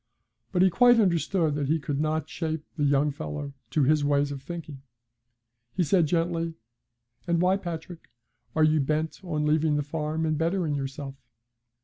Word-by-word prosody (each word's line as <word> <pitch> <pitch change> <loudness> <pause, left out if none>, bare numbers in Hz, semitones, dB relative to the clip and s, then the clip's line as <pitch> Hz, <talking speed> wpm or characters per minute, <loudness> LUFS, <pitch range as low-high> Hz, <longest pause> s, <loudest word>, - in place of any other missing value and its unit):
But 180 -1 +3
he 190 - +5
quite 245 +5 +6
understood 170 -4 +2
that 145 -1 -1
he 160 +3 +2
could 145 -2 -3
not 155 0 -1
shape 160 -2 -4
the 145 - 0
young 145 +1 +3
fellow 135 - -6 0.2
to 140 +4 +2
his 150 +2 +3
ways 145 0 +2
of 140 -2 -6
thinking. 150 -2 -7 0.9
He 185 - +2
said, 165 +1 +3
gently: 165 0 0 0.7
'And 170 -1 +2
why, 180 +2 +3
Patrick, 175 -2 -7 0.5
are 160 - +4
you 155 0 +4
bent 155 +5 -1
on 155 -4 -1
leaving 155 0 +2
the 145 - 0
farm 155 +2 -2
and 155 -1 0
bettering 165 -1 0
yourself?' 135 0 -5
155 Hz, 165 wpm, -27 LUFS, 145-170 Hz, 0.9 s, quite